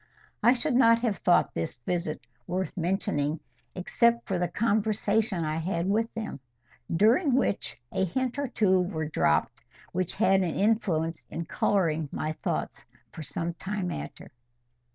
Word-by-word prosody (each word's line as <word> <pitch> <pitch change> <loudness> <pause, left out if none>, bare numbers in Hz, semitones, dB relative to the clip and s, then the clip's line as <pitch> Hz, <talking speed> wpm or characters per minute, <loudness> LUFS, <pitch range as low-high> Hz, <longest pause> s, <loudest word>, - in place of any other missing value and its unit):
I 240 - +6
should 265 +3 0
not 230 -2 +5
have 225 -5 0
thought 175 - +3
this 80 - -3
visit 170 +2 -3 0.2
worth 185 +2 -2
mentioning, 170 -4 -1 0.4
except 235 +5 +2
for 185 -2 -1
the 175 - +1
conversation 215 -1 0
I 155 +1 -1
had 170 +1 -1
with 225 +3 +1
them, 220 -9 -5 0.5
during 240 - +4
which 255 -6 0
a - - 0
hint 260 - -2
or 285 - -1
two 190 -6 +3
were 175 -4 -2
dropped 75 - +1 0.3
which 185 0 -2
had 195 -2 +4
an 175 -3 -1
influence 180 -7 +1
in 170 - -4
colouring 160 -5 0
my 155 - -2
thoughts - - -4 0.2
for - - -8
some 170 +3 -3
time 190 +1 -3
after. - - -7
190 Hz, 150 wpm, -28 LUFS, 165-225 Hz, 0.5 s, I